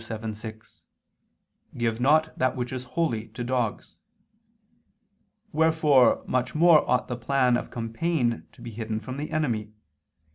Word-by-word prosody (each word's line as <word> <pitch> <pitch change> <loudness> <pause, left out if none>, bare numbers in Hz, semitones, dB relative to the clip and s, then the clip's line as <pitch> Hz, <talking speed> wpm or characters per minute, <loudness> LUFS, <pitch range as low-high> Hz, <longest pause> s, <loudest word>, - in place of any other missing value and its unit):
7:6: 110 0 -8 1.0
"Give 115 -1 -1
not 155 +4 +3
that 130 0 0
which 125 0 -4
is 130 0 -5
holy, 115 -10 0
to 120 - -7
dogs." 120 -3 -2 1.5
Wherefore 155 -5 +4
much 125 +1 -1
more 165 -1 +5
ought 125 - +2
the 125 - -3
plan 125 +1 +2
of - - -3
campaign 120 +2 -1
to 120 - -15
be 120 - -7
hidden 110 0 -4
from 130 +3 -7
the 150 +2 -4
enemy. 115 -9 -2
125 Hz, 135 wpm, -26 LUFS, 115-145 Hz, 1.5 s, more